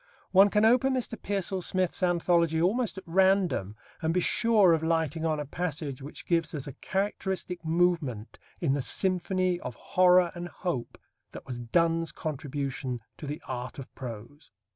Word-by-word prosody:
One 195 +2 +7
can 210 +1 +3
open 255 +3 +4
Mr. 245 -2 -2
Pearsall 195 -3 -2
Smith's 185 +1 -1
anthology 170 -2 +2
almost 210 +6 +1
at 190 - -7
random 185 - +2 0.3
and 160 +1 0
be - - +4
sure 210 -1 +4
of 160 - +1
lighting 160 0 0
on 155 -1 0
a 150 - -3
passage 150 -3 -4
which 140 +3 -9
gives 165 -3 0
us 140 - -3
a 140 - -7
characteristic 190 -1 -2
movement 160 -9 0 0.2
in 150 -6 +1
the 140 - 0
symphony 185 +2 +1
of 125 -7 -6
horror 180 -1 +4
and 175 0 -6
hope 175 -9 -4 0.4
that - - -9
was 125 -3 -6
Donne's 165 +7 +1
contribution 140 -4 -4 0.2
to 150 - -7
the 150 +2 -5
art 125 -1 -5
of 135 - -9
prose. 125 +4 -9
170 Hz, 165 wpm, -28 LUFS, 145-185 Hz, 0.4 s, One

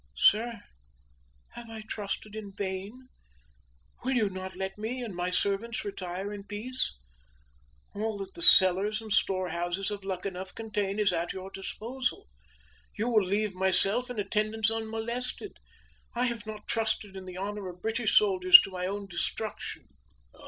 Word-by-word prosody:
Sir, 230 - +4 0.9
have 235 -1 -9
I 220 -1 -7
trusted 215 0 -4
in 205 -2 -7
vain? 200 +7 -5 0.9
Will 260 +1 +1
you 215 -5 +3
not 190 0 -6
let 190 +1 -3
me 245 +4 -3
and 215 -6 -5
my 180 +1 -1
servants 200 +5 0
retire 195 0 -4
in 200 -1 -7
peace? 215 - -2 1.0
All 215 +1 -2
that 195 -1 -6
the 345 - -8
cellars 200 - +6
and 220 -2 -3
storehouses 185 0 0
of 205 -1 -5
Luckenough 190 0 -4
contain 210 -3 -2
is 205 -3 +3
at 170 0 -1
your 190 0 -7
disposal. 255 - -3 0.7
You 225 +3 0
will 220 -4 +4
leave 205 +2 0
myself 195 +6 +2
and 245 - -5
attendants 215 +2 +1
unmolested. 225 - -3 0.6
I 245 +1 +2
have 235 -3 -3
not 215 -1 -7
trusted 220 -3 -1
in 190 -1 -7
the 185 -1 -8
honor 200 0 -4
of 180 0 -12
British 225 0 +2
soldiers 370 -3 +9
to 195 - -6
my 180 0 -2
own 200 +1 -3
destruction!" 195 +3 -4
210 Hz, 150 wpm, -29 LUFS, 190-225 Hz, 1.0 s, soldiers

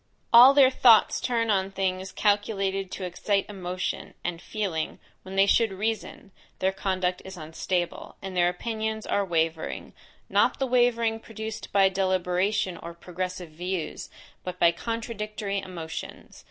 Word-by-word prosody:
All 250 +4 +10
their 265 -2 +7
thoughts 235 -4 +5
turn 230 -3 +1
on 190 -1 +1
things 190 -1 -2
calculated 195 -2 0
to 190 - -6
excite 195 +3 0
emotion; 185 -2 -4
and, 170 -1 -3
feeling, 190 -8 -3 0.2
when 190 +1 -9
they 195 0 +5
should 225 +1 +3
reason, 210 0 -4 0.3
their 190 0 +1
conduct 185 -2 -1
is 190 -1 -9
unstable, 170 +2 -3
and 190 -1 -7
their 175 -1 +4
opinions 220 +3 -3
are 205 - +1
wavering, 165 -3 -2 0.3
not - - +3
the 270 - 0
wavering 240 -3 +2
produced 220 -1 -7
by 195 -1 +5
deliberation 185 0 0
or 170 0 -9
progressive 180 0 -5
views, 175 +1 -4 0.3
but 180 0 -5
by 170 -1 +5
contradictory 215 0 -4
emotions. 170 -4 -8
195 Hz, 140 wpm, -26 LUFS, 180-220 Hz, 0.3 s, All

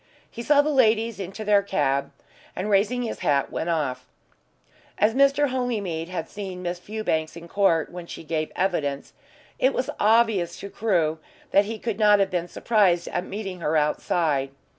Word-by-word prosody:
He 235 - -7
saw 290 +4 +4
the 305 - 0
ladies 225 -5 +2
into 195 +3 -6
their 205 -1 +4
cab, 140 -8 0 0.4
and, 205 +3 -3
raising 215 +5 +2
his 230 - -4
hat, 140 -1 +1
went 170 - -3
off. 150 -6 -2 0.9
As 210 +2 +3
Mr. 275 +2 +3
Holymead 210 -10 -2
had 175 -3 -4
seen 190 -3 -7
Miss 175 0 -3
Fewbanks 180 -6 -2
in 170 0 -10
court 170 -4 +2
when 175 -1 -8
she - - -8
gave 155 -1 -2
evidence, 150 -7 -1 0.5
it 265 +1 +2
was 255 - -1
obvious 215 -6 +2
to 200 - -7
Crewe 170 -8 0 0.3
that 200 +1 +5
he 220 +2 -5
could 220 -1 -4
not 210 -1 +6
have 195 -1 +1
been 175 -1 -1
surprised 190 -3 +2
at 180 - -2
meeting 195 -3 -6
her 160 -1 0
outside. 150 -2 0
195 Hz, 170 wpm, -24 LUFS, 165-220 Hz, 0.9 s, not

